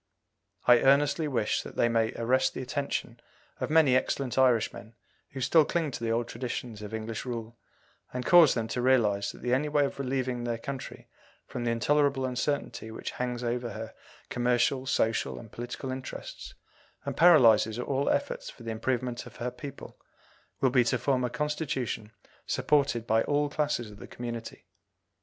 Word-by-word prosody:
I 120 Hz, -1 st, +7 dB
earnestly 145 Hz, +3 st, +3 dB
wish 120 Hz, -7 st, 0 dB
that -, -, -10 dB
they -, -, +3 dB
may 115 Hz, -1 st, +1 dB
arrest 130 Hz, +3 st, +1 dB
the -, -, -3 dB
attention 140 Hz, +2 st, -3 dB, 0.4 s
of -, -, -2 dB
many 155 Hz, -5 st, +5 dB
excellent 130 Hz, -1 st, 0 dB
Irishmen 115 Hz, -3 st, +1 dB, 0.3 s
who 135 Hz, -, -7 dB
still 150 Hz, +5 st, +5 dB
cling 160 Hz, -1 st, -1 dB
to 115 Hz, -, -6 dB
the 115 Hz, -, 0 dB
old 115 Hz, +1 st, 0 dB
traditions 120 Hz, -2 st, -5 dB
of 105 Hz, 0 st, -7 dB
English 110 Hz, 0 st, -4 dB
rule, 115 Hz, -2 st, -5 dB, 0.6 s
and 125 Hz, 0 st, -4 dB
cause 175 Hz, -5 st, +7 dB
them 115 Hz, -2 st, -1 dB
to 125 Hz, -, -2 dB
realize 110 Hz, -6 st, +2 dB
that -, -, -14 dB
the 125 Hz, -, +1 dB
only 145 Hz, +4 st, +1 dB
way 145 Hz, -1 st, +3 dB
of 140 Hz, -, -5 dB
relieving 130 Hz, -2 st, -2 dB
their 120 Hz, -1 st, -2 dB
country 135 Hz, +3 st, -7 dB, 0.4 s
from 120 Hz, -1 st, -5 dB
the -, -, +1 dB
intolerable 135 Hz, +3 st, +2 dB
uncertainty 125 Hz, -2 st, -2 dB
which 110 Hz, -, -6 dB
hangs 125 Hz, -1 st, -3 dB
over 120 Hz, -1 st, -2 dB
her 110 Hz, +1 st, -7 dB, 0.4 s
commercial, 125 Hz, +2 st, +1 dB
social, 115 Hz, -3 st, 0 dB
and 110 Hz, -, -11 dB
political 120 Hz, +2 st, -5 dB
interests 130 Hz, 0 st, -7 dB, 0.5 s
and -, -, -3 dB
paralyzes 115 Hz, -10 st, +6 dB
all 135 Hz, +3 st, -1 dB
efforts 140 Hz, -, -1 dB
for 120 Hz, -, -13 dB
the 115 Hz, -, -4 dB
improvement 120 Hz, +2 st, -2 dB
of -, -, -14 dB
her 125 Hz, +1 st, -3 dB
people, 135 Hz, +3 st, -10 dB, 0.6 s
will 130 Hz, -, +3 dB
be 125 Hz, -1 st, +5 dB
to 125 Hz, +2 st, +1 dB
form 130 Hz, +1 st, +1 dB
a 125 Hz, -, 0 dB
Constitution 135 Hz, -6 st, -3 dB, 0.4 s
supported 140 Hz, -6 st, +1 dB
by 110 Hz, 0 st, +3 dB
all 145 Hz, 0 st, +1 dB
classes 145 Hz, -8 st, -1 dB
of 105 Hz, -, -13 dB
the -, -, -9 dB
community. 120 Hz, -1 st, -7 dB
125 Hz, 170 wpm, -29 LUFS, 115-135 Hz, 0.6 s, I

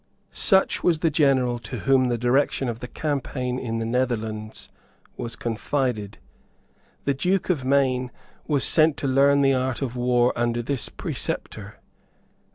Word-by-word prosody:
Such 190 Hz, -2 st, +2 dB
was 170 Hz, -3 st, +3 dB
the 165 Hz, -, +2 dB
general 130 Hz, -5 st, +2 dB
to -, -, -7 dB
whom 135 Hz, -2 st, +3 dB
the 120 Hz, -1 st, 0 dB
direction 130 Hz, +3 st, +1 dB
of 115 Hz, -1 st, -4 dB
the 125 Hz, -, -6 dB
campaign 130 Hz, -3 st, -3 dB
in 115 Hz, -3 st, -3 dB
the 115 Hz, -, -2 dB
Netherlands 110 Hz, -3 st, -2 dB, 0.5 s
was 115 Hz, -, -6 dB
confided. 115 Hz, -2 st, -2 dB, 0.9 s
The 140 Hz, -, +2 dB
Duke 180 Hz, +7 st, 0 dB
of 150 Hz, -7 st, -2 dB
Maine 130 Hz, -2 st, +1 dB, 0.4 s
was 145 Hz, -4 st, +1 dB
sent 155 Hz, -2 st, +3 dB
to 140 Hz, -, -2 dB
learn 140 Hz, +1 st, +4 dB
the 135 Hz, 0 st, +4 dB
art 130 Hz, -1 st, -1 dB
of 125 Hz, -2 st, -4 dB
war 125 Hz, 0 st, +2 dB
under 120 Hz, 0 st, 0 dB
this 135 Hz, 0 st, -3 dB
preceptor. -, -, -5 dB
130 Hz, 150 wpm, -24 LUFS, 120-140 Hz, 0.9 s, learn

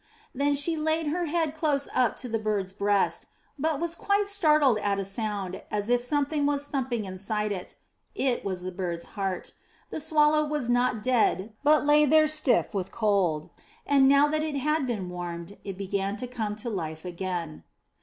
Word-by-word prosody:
'* -, -, -29 dB
Then 285 Hz, +1 st, +1 dB
she 305 Hz, +4 st, +2 dB
laid 315 Hz, 0 st, 0 dB
her 350 Hz, +2 st, -1 dB
head 320 Hz, -1 st, 0 dB
close 300 Hz, -3 st, 0 dB
up 250 Hz, -3 st, +2 dB
to 250 Hz, -, -5 dB
the 225 Hz, -1 st, -1 dB
bird's 205 Hz, -3 st, -2 dB
breast, 200 Hz, 0 st, +1 dB, 0.3 s
but 310 Hz, 0 st, 0 dB
was 340 Hz, 0 st, -2 dB
quite 400 Hz, +3 st, 0 dB
startled 300 Hz, -, +4 dB
at 200 Hz, -1 st, 0 dB
a 195 Hz, -, -2 dB
sound, 195 Hz, -2 st, -3 dB
as 210 Hz, +1 st, -2 dB
if 245 Hz, 0 st, +3 dB
something 290 Hz, +2 st, +1 dB
was 285 Hz, 0 st, 0 dB
thumping 255 Hz, -6 st, -2 dB
inside 205 Hz, +3 st, -2 dB
it. 185 Hz, -3 st, -5 dB, 0.4 s
It 260 Hz, -3 st, 0 dB
was 185 Hz, -2 st, -3 dB
the 185 Hz, -, -4 dB
bird's 175 Hz, -2 st, -4 dB
heart. 195 Hz, -3 st, -3 dB, 0.4 s
The -, -, -3 dB
swallow 305 Hz, 0 st, +3 dB
was 295 Hz, -5 st, -2 dB
not 245 Hz, -3 st, +1 dB
dead 220 Hz, -4 st, +1 dB
but 300 Hz, 0 st, +4 dB
lay 295 Hz, 0 st, +5 dB
there 310 Hz, +2 st, +5 dB
stiff 305 Hz, -7 st, +1 dB
with 190 Hz, -2 st, -3 dB
cold, 195 Hz, -8 st, 0 dB, 0.3 s
and, 275 Hz, -2 st, +5 dB
now 280 Hz, +1 st, +6 dB
that 305 Hz, +1 st, 0 dB
it 310 Hz, -2 st, -2 dB
had 300 Hz, 0 st, 0 dB
been 210 Hz, -7 st, -3 dB
warmed, 175 Hz, +1 st, -6 dB
it 195 Hz, -2 st, -6 dB
began 195 Hz, +1 st, -2 dB
to 250 Hz, -, -4 dB
come 225 Hz, -4 st, -3 dB
to 220 Hz, +3 st, -5 dB
life 160 Hz, -4 st, -5 dB
again. 175 Hz, -3 st, -4 dB
245 Hz, 185 wpm, -27 LUFS, 195-300 Hz, 0.4 s, now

